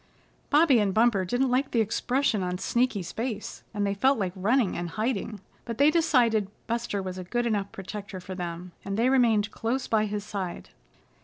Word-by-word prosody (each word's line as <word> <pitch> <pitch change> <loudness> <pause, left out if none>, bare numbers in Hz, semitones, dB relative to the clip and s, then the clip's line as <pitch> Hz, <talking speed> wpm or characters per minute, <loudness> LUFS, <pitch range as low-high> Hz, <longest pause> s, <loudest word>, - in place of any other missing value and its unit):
Bobby 295 -4 +5
and 200 -3 +1
Bumper 220 -4 +3
didn't 245 +7 +1
like 265 +2 +1
the 235 - +1
expression 230 +1 +1
on 180 0 -2
Sneaky's 210 -4 0
face, 225 -3 -4
and 205 -2 -1
they 200 - 0
felt 260 +7 +3
like 190 -4 -2
running 215 +3 +2
and 175 0 -3
hiding, 215 0 -2 0.2
but 230 -1 -5
they 285 +2 +5
decided 240 - +3 0.2
Buster 230 -4 -2
was 185 0 -5
a - - -5
good 240 +7 -1
enough 205 -4 -1
protector 195 0 -7
for 185 +1 -8
them, 175 0 -5
and 195 +1 -3
they 235 +3 +3
remained 230 -5 +3
close 255 +4 -2
by 215 -1 +2
his 210 -1 -3
side. 190 -4 -5
215 Hz, 185 wpm, -27 LUFS, 195-245 Hz, 0.2 s, Bobby